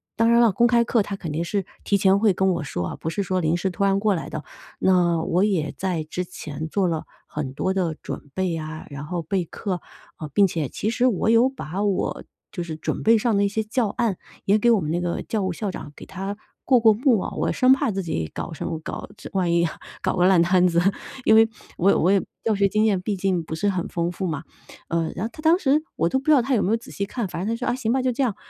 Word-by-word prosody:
当 230 Hz, 0 st, +3 dB
然 235 Hz, -, +5 dB
了， 230 Hz, -4 st, +5 dB
公 235 Hz, +5 st, +3 dB
开 240 Hz, -1 st, +4 dB
课 230 Hz, -2 st, +2 dB
他 200 Hz, 0 st, -5 dB
肯 165 Hz, -6 st, -5 dB
定 160 Hz, +3 st, -1 dB
是 195 Hz, +2 st, -2 dB, 0.2 s
提 200 Hz, -, +2 dB
前 195 Hz, 0 st, +4 dB
会 205 Hz, -1 st, +3 dB
跟 190 Hz, +2 st, +1 dB
我 170 Hz, -, -3 dB
说 90 Hz, -11 st, -3 dB
啊， -, -, -5 dB
不 160 Hz, -, -4 dB
是 200 Hz, +5 st, -2 dB
说 185 Hz, -1 st, -1 dB
临 165 Hz, +1 st, +1 dB
时 190 Hz, +2 st, -1 dB
突 195 Hz, +2 st, -2 dB
然 195 Hz, 0 st, +3 dB
过 205 Hz, -1 st, +2 dB
来 165 Hz, -, -5 dB
的。 155 Hz, -, -6 dB, 0.3 s
那 175 Hz, -3 st, +3 dB
我 180 Hz, +4 st, +1 dB
也 180 Hz, -8 st, 0 dB
在 180 Hz, -5 st, -2 dB
之 180 Hz, +3 st, -3 dB
前 155 Hz, -3 st, -7 dB
做 190 Hz, +2 st, +1 dB
了 165 Hz, -2 st, -2 dB, 0.2 s
很 145 Hz, -3 st, -4 dB
多 185 Hz, +7 st, -1 dB
的 175 Hz, -4 st, -1 dB
准 145 Hz, -, -7 dB
备 185 Hz, -1 st, -1 dB
啊， 155 Hz, 0 st, -6 dB
然 145 Hz, 0 st, -7 dB
后 175 Hz, +2 st, -3 dB
备 180 Hz, +3 st, -1 dB
课， 180 Hz, +2 st, -4 dB, 0.4 s
呃 155 Hz, -, -5 dB
并 200 Hz, -1 st, +5 dB
且 160 Hz, -6 st, -3 dB
其 215 Hz, -, -2 dB
实 240 Hz, +2 st, +1 dB
我 220 Hz, -2 st, +1 dB
有 230 Hz, +3 st, +5 dB
把 200 Hz, -, -4 dB
我 200 Hz, -2 st, -1 dB, 0.3 s
就 175 Hz, -, -5 dB
是 160 Hz, -2 st, -6 dB
准 155 Hz, -, -3 dB
备 225 Hz, +1 st, +5 dB
上 225 Hz, 0 st, +1 dB
的 200 Hz, -, +3 dB
一 -, -, +3 dB
些 220 Hz, +2 st, -1 dB
教 220 Hz, +2 st, 0 dB
案 215 Hz, -3 st, -1 dB, 0.3 s
也 200 Hz, +2 st, +4 dB
给 235 Hz, +3 st, +4 dB
我 225 Hz, -, +4 dB
们 155 Hz, -4 st, -3 dB
那 175 Hz, +2 st, 0 dB
个 175 Hz, -1 st, -2 dB
教 215 Hz, -3 st, -2 dB
务 190 Hz, -, 0 dB
校 200 Hz, +4 st, -3 dB
长 145 Hz, -, -8 dB
给 -, -, -11 dB
他 195 Hz, +2 st, -5 dB, 0.3 s
过 255 Hz, -2 st, +5 dB
过 225 Hz, -1 st, +6 dB
目 235 Hz, 0 st, +3 dB
哦。 -, -, -4 dB
我 -, -, 0 dB
生 255 Hz, 0 st, +5 dB
怕 265 Hz, -, +1 dB
自 195 Hz, -1 st, -3 dB
己 80 Hz, -, -3 dB
搞 170 Hz, -, -5 dB
什 155 Hz, -, -5 dB
么 165 Hz, -, -3 dB
搞， -, -, -6 dB
这 -, -, -9 dB
万 185 Hz, -3 st, +1 dB
一 170 Hz, 0 st, +3 dB, 0.4 s
搞 -, -, 0 dB
个 180 Hz, -1 st, +3 dB
烂 190 Hz, -2 st, +5 dB
摊 180 Hz, +1 st, +4 dB
子， 170 Hz, -1 st, +2 dB, 0.5 s
因 -, -, +6 dB
为 225 Hz, 0 st, +6 dB, 0.3 s
我 190 Hz, -, +3 dB
也 -, -, +5 dB
我 180 Hz, -, +3 dB
也 200 Hz, -1 st, +4 dB, 0.2 s
教 225 Hz, -, +2 dB
学 200 Hz, 0 st, +3 dB
经 215 Hz, +2 st, +1 dB
验 205 Hz, -4 st, +2 dB
毕 205 Hz, +2 st, -2 dB
竟 185 Hz, -2 st, 0 dB
不 160 Hz, 0 st, -5 dB
是 205 Hz, +5 st, 0 dB
很 185 Hz, -3 st, -2 dB
丰 170 Hz, 0 st, -2 dB
富 185 Hz, +1 st, -3 dB
嘛。 155 Hz, -2 st, -3 dB, 0.5 s
呃 165 Hz, -1 st, 0 dB
然 185 Hz, -, -2 dB
后 -, -, -3 dB
他 310 Hz, -, -10 dB
当 325 Hz, +2 st, +5 dB
时 295 Hz, -3 st, +3 dB
我 170 Hz, -, +1 dB
都 265 Hz, -, +1 dB
不 270 Hz, -, -16 dB
知 310 Hz, -, +4 dB
道 280 Hz, -5 st, +6 dB
他 265 Hz, +3 st, -1 dB
有 210 Hz, -, +2 dB
没 190 Hz, -, 0 dB
有 -, -, +4 dB
仔 230 Hz, -, -13 dB
细 200 Hz, -, -2 dB
看， 225 Hz, 0 st, -3 dB
反 175 Hz, -, -5 dB
正 225 Hz, +4 st, -1 dB
他 -, -, -6 dB
说： 245 Hz, -, -4 dB
“啊， -, -, -1 dB
行 235 Hz, -3 st, -1 dB
吧， 265 Hz, -, +1 dB
就 255 Hz, 0 st, +1 dB
这 250 Hz, -, -2 dB
样。 230 Hz, -6 st, 0 dB
190 Hz, 300 characters per minute, -23 LUFS, 170-220 Hz, 0.5 s, 过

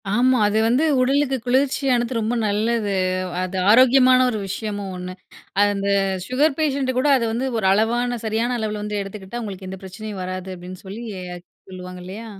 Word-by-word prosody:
ஆமா. 255 Hz, +2 st, +4 dB
அது 210 Hz, +1 st, 0 dB
வந்து 250 Hz, +6 st, +2 dB, 0.2 s
உடலுக்கு 270 Hz, +1 st, +2 dB
குளிர்ச்சியானது. 260 Hz, -1 st, +1 dB
ரொம்ப 220 Hz, +2 st, -1 dB
நல்லது. 210 Hz, 0 st, 0 dB, 0.5 s
அது 185 Hz, +1 st, -4 dB
ஆரோக்கியமான 255 Hz, +2 st, +6 dB
ஒரு 220 Hz, -3 st, -2 dB
விஷயமும் 205 Hz, 0 st, -4 dB
ஒண்ணு. 180 Hz, 0 st, -6 dB, 0.5 s
அந்த 200 Hz, -1 st, 0 dB, 0.4 s
சுகர் 275 Hz, +3 st, +2 dB
பேஷண்ட் 275 Hz, -4 st, +1 dB
கூட 275 Hz, -, +1 dB
அது 235 Hz, -, -1 dB
வந்து 245 Hz, +4 st, -1 dB
ஒரு 205 Hz, -, -2 dB
அளவான 240 Hz, +4 st, +1 dB
சரியான 225 Hz, +3 st, 0 dB
அளவில 215 Hz, -1 st, -3 dB
வந்து 210 Hz, 0 st, -3 dB
எடுத்துக்கிட்டா, 195 Hz, +3 st, -7 dB
உங்களுக்கு 190 Hz, -2 st, -7 dB
எந்த 190 Hz, -, -7 dB
பிரச்சனையும் 195 Hz, +1 st, -7 dB
வராது. 185 Hz, 0 st, -5 dB
அப்படின்னு 180 Hz, +1 st, -9 dB
சொல்லி 210 Hz, +5 st, -7 dB, 0.7 s
சொல்லுவாங்க 180 Hz, 0 st, -8 dB
இல்லையா. 200 Hz, +5 st, -8 dB
220 Hz, 155 wpm, -22 LUFS, 195-255 Hz, 0.7 s, ஆரோக்கியமான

